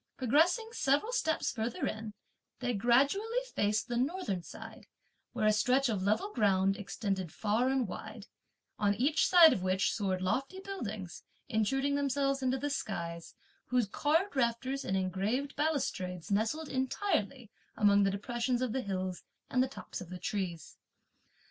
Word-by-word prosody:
Progressing 320 - +3
several 290 - +1
steps 320 -10 0
further 230 -1 -2
in, 215 -1 -4 0.4
they 245 -1 -1
gradually 275 - +2 0.2
faced 210 +2 +1
the 240 -1 -2
northern 255 - -1
side, - - -11 0.4
where - - -1
a 215 - +5
stretch 250 +5 +2
of 205 -4 -1
level 215 - 0
ground 195 -3 +3
extended 195 -3 -3
far 225 +4 +1
and 265 -4 +1
wide, 215 +2 -8 0.5
on 205 -1 +2
each 280 +8 +2
side 340 -3 +8
of 190 - -3
which 185 +1 +1
soared 195 -4 -1
lofty 270 - -1
buildings, 215 - -6 0.3
intruding 270 +5 +1
themselves 275 -1 0
into 260 0 +1
the 290 +2 -2
skies, 170 -9 -4 0.3
whose 250 -2 +2
carved 310 - 0
rafters 260 +2 0
and 190 - -1
engraved 195 +9 -1
balustrades 195 - -2
nestled 225 +10 0
entirely 260 - -1 0.3
among 205 -1 +5
the 195 - +3
depressions 240 +5 -1
of 245 -4 -1
the 265 - 0
hills 185 -3 -3 0.3
and 255 - +3
the 260 - +2
tops 270 - -8
of 180 - -9
the 180 - -6
trees. 180 -2 -4
235 Hz, 150 wpm, -32 LUFS, 200-275 Hz, 0.5 s, side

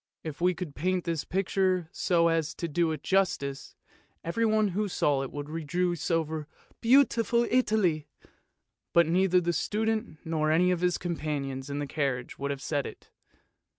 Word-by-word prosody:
If 155 0 -6
we 180 0 +3
could 170 -4 -6
paint 180 +4 0
this 165 -3 -2
picture 185 -2 0
so 170 -3 +2
as 160 -2 0
to 170 - -3
do 165 +1 +1
it 155 -2 -5
justice, 180 -8 0 0.5
everyone 215 +3 +2
who 205 +3 -1
saw 145 -7 +1
it 135 - -5
would 145 0 -5
rejoice 165 +2 -2
over 160 -2 -1 0.2
'* - - -32
beautiful 235 -2 +4
Italy! 210 - +2 0.4
" - - -54
but 170 0 +7
neither 180 +2 +3
the 175 -1 0
student 220 +1 -1
nor 155 -1 0
any 175 +4 +4
of 175 -1 -1
his 180 -1 +2
com 170 -2 -3
panions 140 -3 -3
in 140 - -3
the 145 - -2
carriage 135 -4 -2
would 140 +1 -2
have 140 -2 -4
said 145 -3 -1
it. - - -12
170 Hz, 175 wpm, -28 LUFS, 150-185 Hz, 0.5 s, but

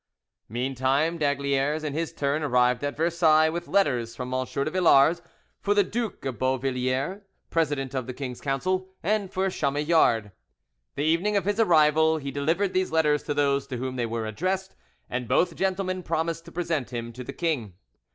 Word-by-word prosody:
Meantime 135 +7 0
d'Aygaliers, 140 +1 0
in 150 -2 -3
his 165 +2 -2
turn, 140 +2 -1
arrived 125 -3 +2
at 145 0 -3
Versailles, 160 -1 +4
with 170 +1 -5
letters 125 -12 +1
from 125 +1 -5
M. 130 0 0
de 140 +3 -1
Villars 170 -2 +4 0.4
for 205 0 +1
the 205 - +5
Duke 220 - -4
of 130 -3 -4
Beauvilliers, 130 - -1 0.3
president 145 -5 0
of 130 -2 -3
the 130 - -4
king's 125 -3 -6
council, 185 +7 -1
and 200 +1 0
for 190 +1 0
Chamillard. 145 - +2 0.6
The 145 - -1
evening 170 +7 +2
of 195 - -1
his 205 +2 0
arrival 160 -4 +4
he 140 -2 -5
delivered 165 +8 0
these 185 0 0
letters 150 -2 +2
to 145 - -2
those 140 -1 +1
to 130 - -4
whom 130 +1 -4
they 120 -2 -1
were 115 0 -3
addressed, 185 - -2 0.3
and 120 0 -3
both 180 - +2
gentlemen 185 -1 -1
promised 165 0 -2
to 170 - -12
present 165 -7 -2
him 120 -1 -5
to 125 +2 -7
the - - -6
king. 130 - -2
150 Hz, 175 wpm, -26 LUFS, 130-170 Hz, 0.6 s, the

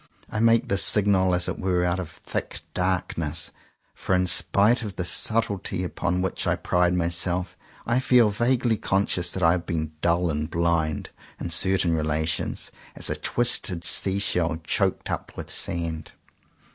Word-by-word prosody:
I 110 - -2
make 115 0 +3
this 100 -1 +2
signal 95 -3 +4
as 90 0 -1
it - - -4
were 90 -1 +1
out 90 +1 0
of 90 -4 -5
thick 85 - -6
darkness; 90 -4 -2 0.4
for 95 - -1
in 90 0 +2
spite 105 +6 +3
of 105 -5 -6
the 90 - -3
sub 110 +5 +2
tlety 95 -3 -3
upon 90 +1 -2
which 95 - -2
I - - +2
pride 90 0 +1
myself, 90 +1 -1 0.3
I 120 +2 +2
feel 125 -4 +4
vaguely 120 +1 +1
conscious 95 -3 0
that 95 - -3
I 85 - +6
have 90 -1 -2
been 80 -2 -2
dull 85 0 +2
and 75 +1 -3
blind, 85 -3 -1 0.3
in 85 - -5
certain 90 0 +2
relations, 80 +1 -2 0.2
as - - -2
a - - -1
twisted 105 -7 0
sea 95 +2 +3
shell 85 -5 0
choked - - 0
up - - -5
with - - -7
sand. 85 -2 -3
90 Hz, 165 wpm, -25 LUFS, 85-100 Hz, 0.4 s, I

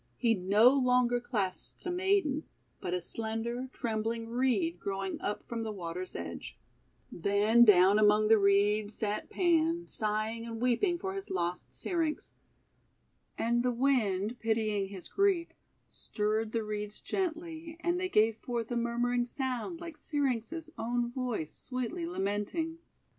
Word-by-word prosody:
He 230 -1 +3
no 205 +4 +5
longer 250 -2 +3
clasped 205 - -3
a 360 - -1
maiden, 360 -5 +1 0.3
but 180 0 -2
a - - 0
slender, 230 +6 -4
trembling 225 -1 -2
Reed 230 -9 +1
growing 195 0 -3
up 205 - -2
from 235 -1 -3
the 220 -1 -3
water's 180 -2 -5
edge. 85 -1 -6 0.5
Then 205 +6 +4
down 200 -1 +6
among 210 0 +5
the 220 0 +6
Reeds 205 +1 +3
sat 210 -1 -2
Pan, 340 -1 +2
sighing 215 +1 -2
and 230 -1 -6
weeping 255 - +2
for 380 +2 -4
his 390 0 -6
lost 175 -1 -2
Syrinx. 330 -4 -2 1.0
And 235 +1 +1
the 250 0 +1
Wind, 235 -4 +1
pitying 215 -3 0
his 190 -2 -9
grief, 390 -4 +2 0.4
stirred 215 +1 -2
the 225 -1 -1
Reeds 210 0 -3
gently, 330 -2 -4
and 345 +1 0
they 370 0 -1
gave 220 - +3
forth 235 -1 -4
a 240 - 0
murmuring 240 +1 +1
sound 260 +6 -3
like 335 -2 -8
Syrinx' 290 +2 -2
own 240 +1 -1
voice 245 - -3
sweetly 265 +7 -4
lamenting. 320 - -2
230 Hz, 140 wpm, -31 LUFS, 210-280 Hz, 1.0 s, down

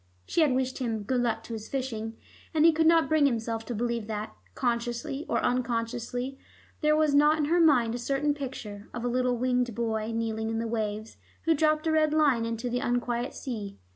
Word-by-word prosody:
She 340 - +1
had 295 -5 +4
wished 260 0 -1
him 225 -4 -2
"good 250 +4 0
luck 225 -2 -1
to 230 - -7
his 220 -1 -6
fishing," 225 -4 -3 0.4
and 310 0 +5
he 330 - +8
could 320 0 +2
not 330 -1 +5
bring 310 -2 +4
himself 225 -2 -2
to 240 - -4
believe 235 -1 -2
that, 215 0 -4 0.2
consciously 240 +4 -2
or - - +1
unconsciously, 245 +1 -2 0.4
there 305 -1 +4
was 305 -2 +3
not 295 +2 +5
in 300 - +1
her 340 +4 +2
mind 255 -9 +4
a 245 - -3
certain 275 +4 0
picture, 230 -7 -7
of 240 0 -4
a - - +1
little 250 0 +1
winged 250 -2 0
boy, 220 -1 -1
kneeling 225 -1 -2
in 225 - -2
the 230 - -1
waves, 215 -1 -3 0.3
who 325 - +4
dropped 310 0 +2
a 320 - +2
red 310 -1 +3
line 280 -7 +3
into 230 +1 -3
the 245 0 -1
unquiet 245 0 -1
sea. 215 -6 -5
245 Hz, 205 wpm, -28 LUFS, 225-285 Hz, 0.4 s, he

